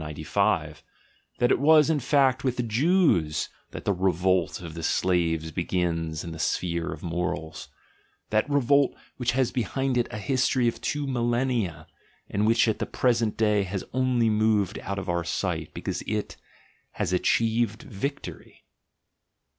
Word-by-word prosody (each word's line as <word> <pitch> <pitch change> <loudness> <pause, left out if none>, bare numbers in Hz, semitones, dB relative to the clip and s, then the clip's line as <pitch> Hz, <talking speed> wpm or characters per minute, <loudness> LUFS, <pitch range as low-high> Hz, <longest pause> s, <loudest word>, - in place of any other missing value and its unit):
195) 80 +1 -1 0.3
— - - -38
that 120 - +2
it - - +3
was, 155 +1 +6
in 160 -2 +1
fact, 130 -1 +2
with 130 -2 0
the 125 - 0
Jews 120 - +2 0.2
that - - -9
the 100 - +2
revolt 90 -1 +1
of 85 -3 -8
the 85 - -6
slaves 80 -2 0
begins 85 -2 -2
in 85 - -6
the 80 - -8
sphere 85 +1 -1
oj - - -16
morals; 80 -2 -3 0.6
that 110 +5 +1
revolt 140 0 +3 0.2
which 125 -1 0
has 130 -1 +1
behind 130 +2 -1
it 120 - 0
a - - -6
history 130 +2 +1
of 115 - -2
two 145 -1 -2
millennia, 120 - -1 0.5
and 105 +2 +1
which 115 +1 +4
at 110 - 0
the - - -2
present 120 -3 +1
day 105 -2 +3
has 95 0 -3
only 130 -2 +2
moved 105 -2 +1
out 100 0 -5
of 100 -1 -5
our 85 -1 0
sight, 85 - -2
because - - -4
it 105 -1 -2 0.3
— - - -35
has - - 0
achieved 115 +3 +1
victory. 140 +8 -6
110 Hz, 160 wpm, -26 LUFS, 90-125 Hz, 0.6 s, was